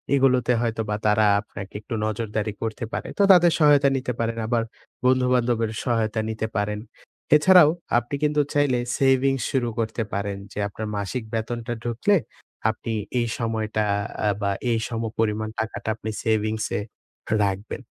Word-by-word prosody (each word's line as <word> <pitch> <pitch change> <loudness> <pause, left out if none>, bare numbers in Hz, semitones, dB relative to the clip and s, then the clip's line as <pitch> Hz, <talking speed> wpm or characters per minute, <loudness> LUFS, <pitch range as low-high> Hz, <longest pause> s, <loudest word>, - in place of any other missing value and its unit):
এগুলোতে 130 -2 +3
হয়তোবা 110 -3 -1
তারা 110 0 +4 0.2
আপনাকে 100 -2 -9
একটু 110 - -7
নজরদারি 110 -1 -2
করতে 110 +1 -3
পারে। - - -3
তো - - +2
তাদের 175 -2 +7
সহায়তা 145 -2 +6
নিতে 125 -1 -2
পারেন, 115 0 -1
আবার 115 -1 +1 0.4
বন্ধুবান্ধবের 125 -3 +2
সহায়তা 115 -3 0
নিতে 110 0 -2
পারেন। 105 +1 -1 0.6
এছাড়াও 165 +1 +7 0.3
আপনি 120 +4 -2
কিন্তু 150 0 +3
চাইলে 145 -4 +2 0.2
সেভিংস 135 -1 +3
শুরু 125 -3 +1
করতে 115 +1 -1
পারেন 100 0 -2
যে, - - -6
আপনার 110 +2 -6
মাসিক 100 +5 -3
বেতনটা 120 +1 -3
ঢুকলে, 125 - +2 0.5
আপনি 110 +1 -4 0.3
এই 120 - 0
সময়টা 110 -2 -1 0.4
অ্যাঁ 105 -2 +1
বা 100 -1 +1 0.2
এই 115 - +2
সমপরিমাণ 110 -2 -1
টাকাটা 110 0 -3
আপনি 110 0 -6
সেভিংসে 110 -1 0 0.6
রাখবেন। 100 +1 -3
115 Hz, 140 wpm, -24 LUFS, 110-125 Hz, 0.6 s, তাদের